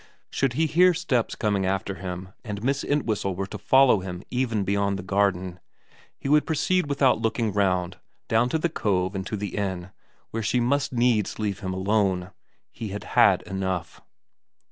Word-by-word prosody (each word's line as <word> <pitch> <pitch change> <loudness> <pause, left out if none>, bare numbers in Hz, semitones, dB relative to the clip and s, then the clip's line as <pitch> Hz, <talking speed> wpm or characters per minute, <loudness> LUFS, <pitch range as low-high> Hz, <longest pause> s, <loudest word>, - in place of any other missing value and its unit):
Should 135 -3 0
he 160 +6 +1
hear 175 +3 +4
steps 140 -10 0
coming 100 -2 0
after 95 +1 -1
him 90 0 -6
and 105 -2 -6
Miss 135 +2 0
Entwhistle 110 -9 -1
were 95 +2 -2
to 105 +1 -8
follow 130 0 +5
him 90 0 -6
even 120 -5 0
beyond 100 0 0
the 90 - -6
garden, 95 -2 0 0.6
he - - -6
would 150 +1 +3
proceed 180 +2 +1
without 135 -5 +3
looking 115 -2 0
round 90 -3 0 0.3
down 115 +2 +2
to 160 - +1
the 160 - +1
cove 95 - -1
and 95 -1 -4
to 105 - -3
the 100 -1 -5
inn, 95 -3 -3 0.4
where 115 - -2
she 115 +3 +1
must 135 +4 +1
needs 120 -4 +1
leave 105 -3 -2
him 95 -2 -4
alone. 95 -1 0 0.4
He 115 - -6
had 105 +1 -6
had - - +5
enough. 95 -3 -4
105 Hz, 175 wpm, -25 LUFS, 95-125 Hz, 0.6 s, follow